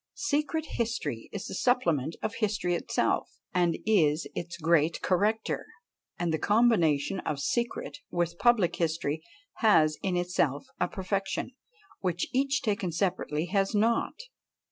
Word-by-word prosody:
Secret 310 Hz, -2 st, 0 dB
history 195 Hz, -, -2 dB
is 205 Hz, 0 st, -5 dB
the -, -, -6 dB
supplement 170 Hz, -, +1 dB
of 220 Hz, 0 st, -1 dB
history 205 Hz, -5 st, 0 dB
itself, 170 Hz, -, -1 dB, 0.2 s
and 175 Hz, -2 st, +2 dB
is 160 Hz, -8 st, +3 dB
its 170 Hz, 0 st, -5 dB
great 160 Hz, -1 st, +2 dB
corrector; 210 Hz, +4 st, +1 dB, 0.5 s
and 170 Hz, -2 st, -1 dB
the 160 Hz, -, 0 dB
combination 195 Hz, -7 st, +3 dB
of 150 Hz, -5 st, -3 dB
secret 235 Hz, +12 st, -2 dB
with 170 Hz, 0 st, -1 dB
public 235 Hz, -8 st, +3 dB
history 160 Hz, -2 st, -1 dB, 0.4 s
has 155 Hz, -9 st, +4 dB
in 185 Hz, -2 st, 0 dB
itself 175 Hz, -6 st, 0 dB
a 180 Hz, -, +2 dB
perfection, 195 Hz, +5 st, -2 dB, 0.5 s
which 175 Hz, -2 st, -1 dB
each 275 Hz, +1 st, +1 dB
taken 200 Hz, -6 st, 0 dB
separately 170 Hz, -3 st, -1 dB
has 195 Hz, +3 st, 0 dB
not. 230 Hz, +3 st, +2 dB
180 Hz, 130 wpm, -29 LUFS, 165-220 Hz, 0.5 s, has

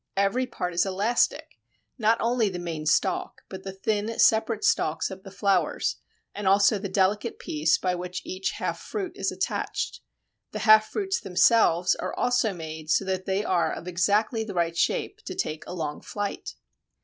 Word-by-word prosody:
Every 200 Hz, +6 st, +1 dB
part 180 Hz, -7 st, -4 dB
is 170 Hz, -, +3 dB
elastic 200 Hz, +5 st, 0 dB, 0.4 s
not 225 Hz, +1 st, +3 dB
only 230 Hz, -2 st, +1 dB
the 185 Hz, -, -5 dB
main 165 Hz, -3 st, -4 dB
stalk, 185 Hz, +4 st, 0 dB
but 190 Hz, -1 st, -7 dB
the 195 Hz, -, -6 dB
thin 210 Hz, +3 st, -2 dB
separate 220 Hz, 0 st, +3 dB
stalks 160 Hz, +5 st, +1 dB
of 190 Hz, 0 st, -8 dB
the 195 Hz, -, -11 dB
flowers 195 Hz, 0 st, 0 dB, 0.4 s
and 205 Hz, -2 st, -4 dB
also 200 Hz, +2 st, +4 dB
the 200 Hz, 0 st, -4 dB
delicate 205 Hz, +4 st, +1 dB
piece 155 Hz, +2 st, +1 dB
by 180 Hz, -1 st, -1 dB
which 180 Hz, +1 st, -5 dB
each 190 Hz, +1 st, -3 dB
half -, -, -3 dB
fruit 390 Hz, -4 st, -4 dB
is -, -, -2 dB
attached. -, -, -3 dB, 0.5 s
The 215 Hz, -, -3 dB
half 215 Hz, -1 st, +7 dB
fruits 390 Hz, -2 st, -1 dB
themselves 185 Hz, -2 st, +4 dB
are -, -, -4 dB
also 245 Hz, -2 st, +2 dB
so 195 Hz, -, -5 dB
made 160 Hz, -2 st, -7 dB
that 190 Hz, -1 st, -3 dB
they 195 Hz, +2 st, 0 dB
are 175 Hz, -2 st, +1 dB
of 175 Hz, -, -7 dB
exactly 205 Hz, +6 st, +1 dB
the 205 Hz, -3 st, -7 dB
right 170 Hz, -1 st, 0 dB
shape -, -, -1 dB
to -, -, -5 dB
take 155 Hz, 0 st, -3 dB
a -, -, -6 dB
long 150 Hz, -4 st, -4 dB
flight. 205 Hz, -1 st, -5 dB
195 Hz, 175 wpm, -26 LUFS, 180-220 Hz, 0.5 s, half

